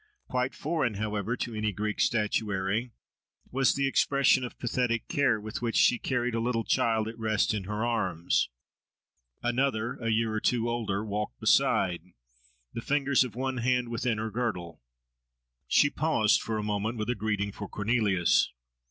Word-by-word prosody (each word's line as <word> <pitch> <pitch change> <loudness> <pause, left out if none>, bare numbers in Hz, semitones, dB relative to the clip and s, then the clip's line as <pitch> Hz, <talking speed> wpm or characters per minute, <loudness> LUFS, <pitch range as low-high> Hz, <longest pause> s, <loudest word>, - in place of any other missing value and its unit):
Quite 125 +1 -1
foreign, 145 -8 -1
however, 105 +3 -2
to 120 - -4
any 110 0 -1
Greek 105 +2 -3
statuary 105 0 0 0.6
was 135 0 +2
the 140 0 +1
expression 135 -1 +3
of 125 - -6
pathetic 120 -1 -1
care, 130 -6 +2
with 105 +1 -6
which 115 -1 -2
she 120 - +4
carried 125 -2 -1
a 115 - 0
little 115 0 0
child 110 -1 +1
at 115 +1 -7
rest 110 -1 +1
in 100 -3 -3
her 105 +3 -2
arms. 95 - 0 0.9
Another, 120 -2 0
a 115 -2 -2
year 110 0 +1
or 110 - 0
two 120 -1 +1
older, 110 -3 -2
walked 105 - -4
beside, 90 -3 +3 0.7
the - - -4
fingers 140 0 +2
of 125 - -7
one 130 +1 -2
hand 125 0 +1
within 120 -1 -1
her 110 +1 -3
girdle. 90 - -3 0.9
She 145 - +4
paused 135 -9 +2
for 110 -1 -3
a 105 - -2
moment 105 +3 -2
with 110 +2 -1
a - - +1
greeting 105 -2 -2
for 100 0 -8
Cornelius. 105 - +2
115 Hz, 160 wpm, -28 LUFS, 105-125 Hz, 0.9 s, she